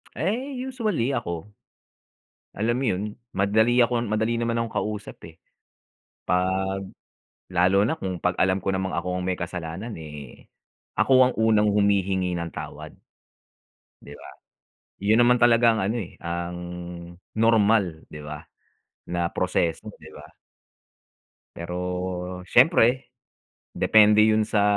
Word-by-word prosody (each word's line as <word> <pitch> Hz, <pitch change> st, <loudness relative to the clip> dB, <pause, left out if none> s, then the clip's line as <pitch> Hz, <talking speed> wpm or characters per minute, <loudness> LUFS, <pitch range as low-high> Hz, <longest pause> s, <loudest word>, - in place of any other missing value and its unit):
Eh, 250 Hz, -, -2 dB
usually 230 Hz, -, -2 dB
ako. 90 Hz, -7 st, -4 dB, 1.1 s
Alam 115 Hz, +4 st, 0 dB
mo 135 Hz, -, -1 dB
yun 100 Hz, -4 st, 0 dB, 0.3 s
madali 110 Hz, +5 st, +3 dB
akon 120 Hz, 0 st, +1 dB
madali 110 Hz, +2 st, 0 dB
naman 115 Hz, 0 st, -1 dB
akong 115 Hz, -1 st, -3 dB
kausap, 105 Hz, -1 st, -4 dB
eh. 80 Hz, -, -18 dB, 0.9 s
'Pag 95 Hz, +1 st, 0 dB, 0.6 s
lalo 95 Hz, +2 st, +3 dB
na 140 Hz, -, 0 dB
kung 95 Hz, -2 st, -4 dB
pag 90 Hz, 0 st, +1 dB
alam 95 Hz, +1 st, +2 dB
ko -, -, 0 dB
namang 95 Hz, 0 st, -2 dB
ako 90 Hz, 0 st, -2 dB
ang -, -, -4 dB
may 95 Hz, -, 0 dB
kasalanan, 90 Hz, +5 st, -5 dB
eh, 75 Hz, -4 st, -11 dB, 0.5 s
ako 135 Hz, -, +4 dB, 0.2 s
ang -, -, -9 dB
unang 110 Hz, -1 st, +3 dB
humihingi 95 Hz, -3 st, +1 dB
ng 85 Hz, 0 st, -4 dB
tawad, -, -, -8 dB, 1.1 s
'di 70 Hz, -, -11 dB
ba? -, -, -12 dB, 0.7 s
Yun 105 Hz, +4 st, +3 dB
naman 120 Hz, +1 st, +5 dB
talaga 120 Hz, -1 st, +5 dB
ang -, -, -1 dB
ano, 110 Hz, +5 st, -1 dB
eh, 90 Hz, -, -8 dB
ang 85 Hz, +1 st, -4 dB, 0.8 s
normal, 110 Hz, -6 st, +2 dB
di 75 Hz, -, -8 dB
ba, 75 Hz, 0 st, -8 dB, 0.7 s
na 85 Hz, 0 st, -1 dB
proseso, 90 Hz, -3 st, -1 dB
'di -, -, -12 dB
ba? -, -, -12 dB, 1.3 s
Pero 90 Hz, +1 st, -4 dB
siyempre, 130 Hz, -, +4 dB, 0.6 s
depende 105 Hz, 0 st, +5 dB
yun 110 Hz, 0 st, +3 dB
sa 105 Hz, -1 st, +1 dB
100 Hz, 130 wpm, -24 LUFS, 90-115 Hz, 1.3 s, naman